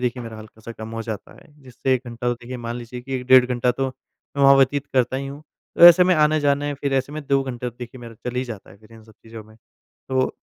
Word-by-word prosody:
देखिए 125 0 -2
मेरा 115 -1 -8
हल्का 110 +1 -14
सा 115 +1 -9
कम 110 0 -9
हो 115 - -4
जाता 110 -3 -7
है, - - -20
जिससे 130 +1 -1
1 125 - -2
घंटा 120 +1 -4
तो 120 - +1
देखिए 125 +1 -9
मान 120 0 -5
लीजिए 125 +1 -8
कि 135 +2 -6
1 125 -1 -3
डेढ़ 130 -1 +7
घंटा 125 0 0
तो, 135 +2 -2 0.5
मैं 140 - +1
वहाँ 140 0 +8
व्यतीत 140 +1 +2
करता 130 0 +1
ही 135 +1 -4
हूँ। 140 +2 -9 0.3
तो 170 - +7
ऐसे 175 +1 +8
में 185 0 +4
आने-जाने 145 -2 +2
फिर 140 0 -3
ऐसे 135 +2 -1
में 155 -1 -6
2 135 0 +2
घंटे 125 -2 -5
तो 115 - -29
देखिए 125 +1 -9
मेरा 115 -1 -10
चल 125 - -5
ही 130 - 0
जाता 110 -6 -9
है 95 - -15
फिर 110 +2 -20
इन 110 -1 -14
सब 110 - -18
चीज़ों 115 -1 -10
में। 110 0 -19 0.5
तो 130 0 0
125 Hz, 275 wpm, -22 LUFS, 115-135 Hz, 0.5 s, वहाँ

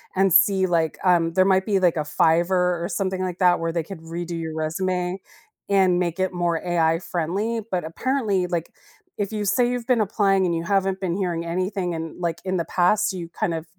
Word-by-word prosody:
and 190 -1 +3
see 190 0 +4
like, 165 -3 0
um, 170 -3 +3
there 185 - +4
might 190 -1 +3
be 200 -3 +1
like 175 -3 +2
a - - +1
Fiverr 175 +3 +2
or - - -1
something 190 0 -2
like 180 -1 -4
that 180 -2 +4
where 165 0 -1
they 165 0 -1
could 165 0 -9
redo 170 +1 -5
your 160 -1 -5
resume 180 +3 -2 0.5
and 190 -3 +3
make 170 0 -2
it 185 -1 0
more 175 -1 0
AI 165 -2 +1
friendly, 195 +7 -2
but 180 -2 -1
apparently, 205 +1 -1
like, 170 -2 -3 0.5
if 205 +1 -2
you 210 -1 -2
say 220 +5 +2
you've 245 -1 -3
been 245 -3 +3
applying 195 -2 +2
and 170 - 0
you 165 - -2
haven't 195 0 0
been 180 -2 -1
hearing 175 -4 -2
anything 180 +1 -2
and 160 0 -6
like 170 -1 -2
in 185 0 -1
the 170 - -1
past, 210 +5 +2
you 175 -3 -6
kind 175 +1 -2
of 160 0 -5
180 Hz, 215 wpm, -23 LUFS, 170-195 Hz, 0.5 s, see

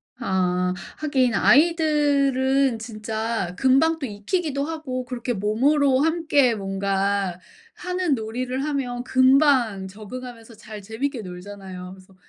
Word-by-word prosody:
아. 180 -6 0 0.2
하긴 265 -5 +1
아이들은 275 -5 +3
진짜 220 -3 -3
금방 275 +5 +3
또 280 - -3
익히기도 280 - -2
하고 295 -6 -4
그렇게 245 -1 -3
몸으로 260 +7 +2
함께 310 -6 +2
뭔가 195 -1 -1 0.4
하는 360 -4 -1
놀이를 250 +4 -3
하면 250 -5 -2
금방 260 -7 +3
적응하면서 230 +3 -10
잘 215 0 -10
재밌게 230 +5 -4
놀잖아요. 185 -1 -9
그래서 190 0 -19
245 Hz, 260 characters per minute, -23 LUFS, 205-280 Hz, 0.4 s, 아이들은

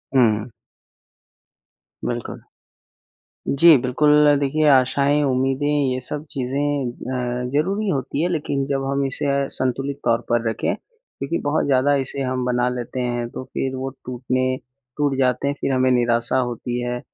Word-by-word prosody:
हुँ। 115 -2 +3 1.5
बिल्कुल। 120 -1 -4 1.1
जी, 155 +2 +7
बिल्कुल 150 +3 +4
देखिए 150 +2 +1
आशाएँ, 140 +2 +3
उम्मीदें 135 +1 0 0.3
ये 130 - -2
सब 150 0 -4
चीज़ें 140 +1 -1 0.6
अ, 125 - -3
ज़रूरी 195 +9 0
होती 140 -2 -1
है 175 - +2
लेकिन 145 -4 -1
जब 135 -1 -1
हम 140 0 0
इसे 135 - -3 0.3
संतुलित 135 +2 -1
तौर 115 -1 +2
पर 120 -1 +2
रखें 110 - -1
क्योंकि 455 - -7
बहुत 145 +2 +1
ज़्यादा 140 +1 +3
इसे 135 +1 -5
हम 130 -1 -1
बना 125 0 +1
लेते 125 +1 -4
हैं 120 -1 -2
तो 130 - -7
फिर 130 0 -2
वो 130 +1 -3 0.2
टूटने 130 +1 -1 0.4
टूट 145 -2 +1
जाते 130 +1 +1
हैं 140 - -1
फिर - - 0
हमें 130 0 +2
निराशा 120 0 +2
होती 120 -1 -2
है। 120 0 -3
130 Hz, 145 wpm, -22 LUFS, 125-145 Hz, 1.5 s, जी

